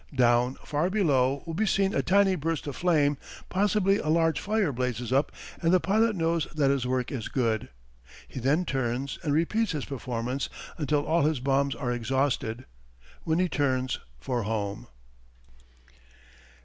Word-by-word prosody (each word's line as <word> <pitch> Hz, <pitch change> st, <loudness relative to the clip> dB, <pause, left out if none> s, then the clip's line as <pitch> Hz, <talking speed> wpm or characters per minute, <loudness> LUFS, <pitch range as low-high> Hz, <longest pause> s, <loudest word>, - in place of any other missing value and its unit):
Down 125 Hz, 0 st, +3 dB
far 155 Hz, +4 st, 0 dB
below 140 Hz, -9 st, +2 dB
will 165 Hz, -, -5 dB
be 215 Hz, +6 st, 0 dB
seen 195 Hz, 0 st, +2 dB
a -, -, +2 dB
tiny 195 Hz, +1 st, +3 dB
burst 165 Hz, 0 st, -2 dB
of 145 Hz, -, -5 dB
flame; 150 Hz, -5 st, +2 dB, 0.3 s
possibly 200 Hz, 0 st, +2 dB
a -, -, -4 dB
large 165 Hz, 0 st, +2 dB
fire 210 Hz, -5 st, 0 dB
blazes 125 Hz, 0 st, -2 dB
up 140 Hz, +2 st, +2 dB, 0.3 s
and 165 Hz, -1 st, +2 dB
the 185 Hz, -, +5 dB
pilot 215 Hz, +4 st, +2 dB
knows 165 Hz, -2 st, 0 dB
that 140 Hz, -3 st, +3 dB
his 135 Hz, -3 st, 0 dB
work 125 Hz, -1 st, -1 dB
is 125 Hz, -6 st, -4 dB
good. 115 Hz, -4 st, -1 dB, 0.6 s
He -, -, -7 dB
then 145 Hz, +8 st, +1 dB
turns 135 Hz, 0 st, -2 dB
and 150 Hz, -, 0 dB
repeats 180 Hz, +8 st, +1 dB
his 150 Hz, -4 st, -3 dB
performance 125 Hz, 0 st, -3 dB, 0.3 s
until 150 Hz, -1 st, 0 dB
all 165 Hz, +1 st, +2 dB
his 150 Hz, -2 st, +1 dB
bombs 135 Hz, +1 st, +1 dB
are 125 Hz, -2 st, -2 dB
exhausted, 125 Hz, -1 st, -1 dB, 0.6 s
when 160 Hz, 0 st, +1 dB
he 180 Hz, +1 st, +2 dB
turns 130 Hz, -5 st, 0 dB, 0.2 s
for 120 Hz, -, -2 dB
home. 100 Hz, -2 st, -3 dB
145 Hz, 160 wpm, -27 LUFS, 125-170 Hz, 0.6 s, the